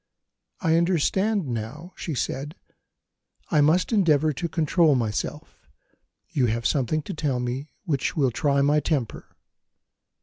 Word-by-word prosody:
"I 165 -3 +3
understand 190 +4 +1
now," 130 +9 -5
she 160 - -4
said; 145 +5 -3 1.0
"I 150 - +4
must 165 +9 +3
endeavour 155 -7 +3
to 170 +5 -3
control 160 -1 +3
myself 110 -4 -4 0.6
you 130 -4 +2
have 115 +1 -2
something 145 +3 +1
to - - -6
tell 145 -5 -1
me 125 +4 -4 0.2
which 145 -4 -1
will 135 -4 +2
try 140 +3 +1
my 145 +2 +3
temper." 145 -7 -2
150 Hz, 130 wpm, -25 LUFS, 130-165 Hz, 1.0 s, I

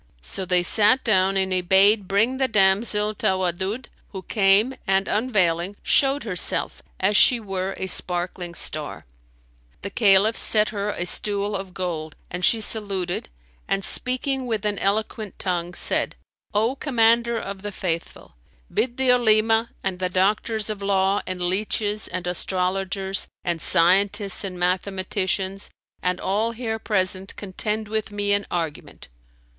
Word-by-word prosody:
So 190 - -5
they 180 -1 +2
sat 215 +7 +5
down 195 -3 +2
and 190 -1 +1
he 185 - +1
bade 195 +3 +4
bring 220 +7 +1
the 265 0 +1
damsel 210 0 +2
Tawaddud 190 +4 -1 0.3
who 190 -1 -7
came 205 +5 +3
and 195 0 +2
unveiling, 195 -5 0
showed 275 0 +2
herself, 185 -6 0 0.2
as 200 +2 +1
she 245 +3 +6
were 195 -2 -4
a - - -3
sparkling 175 -1 -2
star.[FN#297] - - -7
The - - -3
Caliph 205 +1 +4
set 215 -1 +3
her 205 -1 -3
a 175 - -3
stool 205 +2 +1
of 190 -2 -7
gold; 160 -4 -4 0.2
and 180 +1 -5
she 225 - +3
saluted, 200 -5 -1 0.4
and 195 0 -1
speaking 255 +1 +1
with 220 -3 -2
an 205 -1 -1
eloquent 210 +1 -2
tongue, 175 -1 -3
said, - - 0 0.4
"O 225 +5 +1
Commander 235 -3 +2
of 195 -3 -6
the 205 +1 -5
Faithful, 170 -4 -5 0.4
bid 245 0 -1
the 265 -1 +3
Olema 225 -1 +3
and 190 -2 -3
the 185 -1 -1
doctors 210 +3 0
of 205 -1 -7
law 195 0 +1
and 185 0 -4
leaches 205 +3 0
and 185 -1 -5
astrologers 190 +2 -1 0.2
and 170 -2 -2
scientists 195 +5 +2
and 185 -2 -5
mathematicians 190 +1 -2 0.3
and 180 0 -1
all 215 +4 -1
here 220 -2 -4
present 190 -2 -1
contend 210 +2 -4
with 215 0 -3
me 205 0 0
in 200 0 0
argument." 165 -4 -5
195 Hz, 145 wpm, -23 LUFS, 185-215 Hz, 0.4 s, she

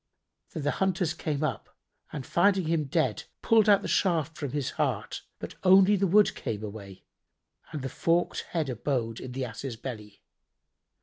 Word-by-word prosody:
Then 155 - -4
the 145 - +1
hunters 185 -3 +1
came 150 -2 -3
up 135 -8 -4 0.3
and 140 -4 -6
finding 190 +3 +2
him 160 -1 0
dead, 130 -4 0 0.2
pulled 220 -2 +4
out 200 -1 +5
the - - -3
shaft 165 -4 +1
from 145 -3 -4
his 140 -1 -2
heart, - - -2 0.2
but - - -7
only 190 +2 +6
the 195 0 +1
wood 205 +4 +4
came 110 -1 -5
away 100 -2 -9 0.7
and 150 -4 -5
the - - -2
forked 170 +6 0
head 160 -4 -1
abode 120 -2 -2
in 125 - -7
the 130 0 -2
Ass's 120 +2 -6
belly. 110 -4 -8
150 Hz, 170 wpm, -28 LUFS, 125-180 Hz, 0.7 s, only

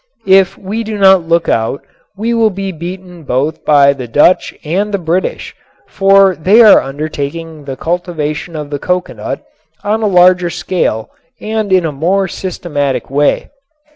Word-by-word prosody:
If 190 -1 +3
we 210 +4 -4
do 215 -1 -5
not 190 -4 +4
look 170 0 +1
out 115 +4 -1 0.3
we 230 +3 -1
will 225 -1 +3
be 195 -1 -5
beaten 180 +1 -8
both 140 +2 -2
by 140 -2 +4
the 130 -3 -8
Dutch 145 +9 +3
and 190 +7 -1
the 200 - 0
British, 175 +1 -3 0.3
for 195 -1 +4
they 200 +9 +5
are 215 - +7
undertaking 150 +2 -6
the 135 -1 -6
cultivation 165 -2 -3
of 150 -1 -6
the 145 - -3
coconut 180 +3 -3 0.4
on 215 +2 -1
a 215 - +1
larger 180 -1 +4
scale 140 -12 -2 0.3
and 215 -2 -3
in 185 -2 +3
a 160 - -1
more 180 +7 0
systematic 150 -8 -3
way. 145 +1 0
175 Hz, 155 wpm, -13 LUFS, 150-195 Hz, 0.4 s, are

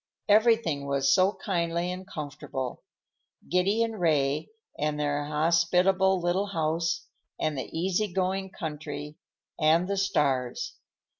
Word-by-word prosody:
Everything 210 -9 +3
was 140 +1 +2
so 190 +2 +4
kindly 170 -2 0
and 185 +1 -7
comfortable; 145 -6 -5 0.7
Giddy 195 +5 +2
and 225 -2 -3
Ray, 150 -4 +1 0.3
and 150 0 -1
their 145 0 0
hospitable 180 +5 +3
little 180 +3 0
house, 165 -2 -1 0.3
and 155 -1 0
the 130 - -3
easy 185 +4 0
going 190 +1 -1
country, 150 -3 -6 0.4
and 160 +3 +4
the 200 0 -1
stars. 145 -11 0
170 Hz, 120 wpm, -28 LUFS, 150-190 Hz, 0.7 s, so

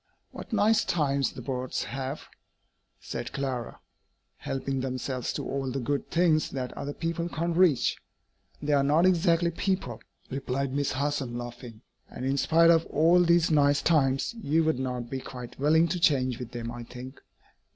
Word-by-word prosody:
"What - - -10
nice 215 +1 +3
times 140 -5 0
the 125 - -8
birds 130 0 -3
have," 135 +3 -5 0.8
said - - -6
Clara, 130 -4 -4 0.6
"helping 135 0 -3
themselves 130 -1 -3
to - - -4
all 135 -1 -2
the 135 +2 -3
good 140 +3 -2
things 165 -3 +2
that 130 -2 -4
other 145 +1 -5
people 170 +1 -2
can't 170 +1 -2
reach!" 170 -7 +3 0.7
"They 145 0 +1
are 140 - +4
not 150 +5 +3
exactly 170 -1 +3
'people,'" 190 +2 -2 0.3
replied 135 0 -2
Miss 140 0 0
Harson, 135 -3 -2
laughing; 120 -2 -8 0.3
"and, 125 - -6
in 135 +1 0
spite 165 +3 +5
of 165 -1 +3
all 165 +4 +4
these 170 -1 +3
'nice 145 -2 +3
times,' 135 - +2
you 160 -1 +2
would 160 -5 +1
not 125 -2 -3
be 135 +2 -4
quite 125 -2 -9
willing 160 +4 +4
to 180 +2 -1
change 130 -7 +2
with 125 -2 -6
them, 115 -1 -5
I 120 0 -7
think." 125 +3 -10
140 Hz, 165 wpm, -28 LUFS, 130-165 Hz, 0.8 s, spite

